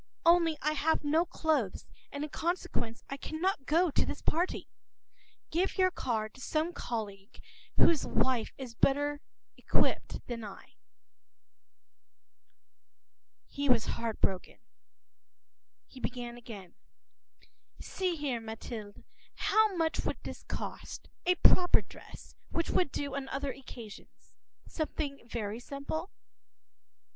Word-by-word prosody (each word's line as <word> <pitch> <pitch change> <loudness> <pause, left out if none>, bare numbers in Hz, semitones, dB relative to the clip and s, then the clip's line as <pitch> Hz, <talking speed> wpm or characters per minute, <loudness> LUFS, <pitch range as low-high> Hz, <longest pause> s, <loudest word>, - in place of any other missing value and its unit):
Only 335 -2 +6
I 305 - +3
have 310 +1 +2
no 315 +4 +3
clothes, 295 - 0 0.3
and 285 +1 -3
in 300 - -4
consequence 320 -9 -1
I 275 - -4
cannot 315 -1 -1
go 335 +2 +4
to - - +3
this - - -4
party. 345 +4 +1 0.8
Give 355 +4 +1
your 370 -1 +5
card 220 -9 -1
to 260 - -13
some 315 +5 0
colleague 205 -7 -5 0.4
whose 325 -4 +6
wife 255 -4 +2
has 255 -3 -6
a - - -36
better 290 +1 +3 0.5
outfit - - +2
than 235 -2 -4
I.” 200 -2 -9 2.7
He 285 -1 -2
was 235 -3 +6
disconsolate. 220 -5 -1 1.3
He 260 - -13
began 245 -1 -3
again:— 215 -7 -9 1.1
“See 370 -2 -1
here, 280 -6 -1
Mathilde, 220 -1 -7 0.3
how 435 -2 +4
much 325 -1 +1
would - - -1
this - - -6
cost, - - -6 0.2
a 360 - +6
proper 355 0 +6
dress, - - -12 0.2
which 335 - 0
would 355 -7 +3
do 285 -1 -2
on 270 -1 -3
other 275 0 -1
occasions; 235 -6 -11 0.3
something 300 -3 -2
very 225 -2 -3
simple? 280 +7 -4
280 Hz, 120 wpm, -32 LUFS, 235-320 Hz, 2.7 s, Only